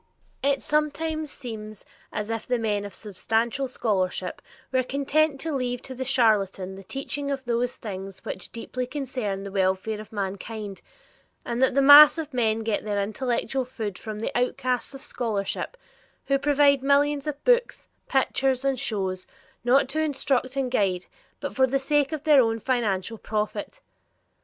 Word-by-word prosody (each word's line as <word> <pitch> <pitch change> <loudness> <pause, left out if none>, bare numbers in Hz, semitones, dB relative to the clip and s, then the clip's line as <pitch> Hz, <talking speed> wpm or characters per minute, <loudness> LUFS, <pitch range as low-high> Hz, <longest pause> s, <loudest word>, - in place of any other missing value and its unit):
It 280 0 +1
sometimes 305 +1 0
seems 215 -4 -8 0.3
as 210 +1 -3
if 225 -1 -4
the 250 - +1
men 210 -3 -1
of 200 - -8
substantial 225 +5 -1
scholarship 190 -7 -1 0.3
were 260 -1 +3
content 280 +3 +1
to 320 -1 -3
leave 245 -2 -2
to 265 - -6
the 260 +1 -4
charletan 205 -7 +2
the 195 - -9
teaching 275 +6 -4
of 270 -1 -3
those 240 +1 0
things 195 -3 -7
which 190 - -5
deeply 250 +2 -4
concern 250 -8 -3
the 200 - -6
welfare 190 +2 0
of 215 - -13
mankind, 200 0 -5 0.6
and 240 +1 -2
that 265 -1 +3
the 275 - +4
mass 295 +2 +10
of 310 -3 -5
men 225 -3 +1
get 220 -2 -1
their 205 -1 -1
intellectual 240 +4 -1
food 225 -6 -5
from 215 -1 -6
the - - -3
outcasts 250 +1 0
of 270 - -9
scholarship, 225 - -3 0.5
who 275 0 +2
provide 285 -1 +4
millions 280 +1 +2
of 290 -1 -4
books, - - +2 0.2
pictures, 265 0 +1
and 270 -2 +1
shows, 190 -7 -2 0.4
not 260 +3 +4
to 310 +3 0
instruct 270 -3 0
and 265 -2 -1
guide, 190 -6 +1 0.3
but 285 - -4
for 260 -1 +4
the 270 +2 +1
sake 290 +1 +1
of 310 -2 -4
their 295 -4 +6
own 225 -1 +1
financial 225 -3 -1
profit. 215 - -3
250 Hz, 160 wpm, -26 LUFS, 210-275 Hz, 0.6 s, mass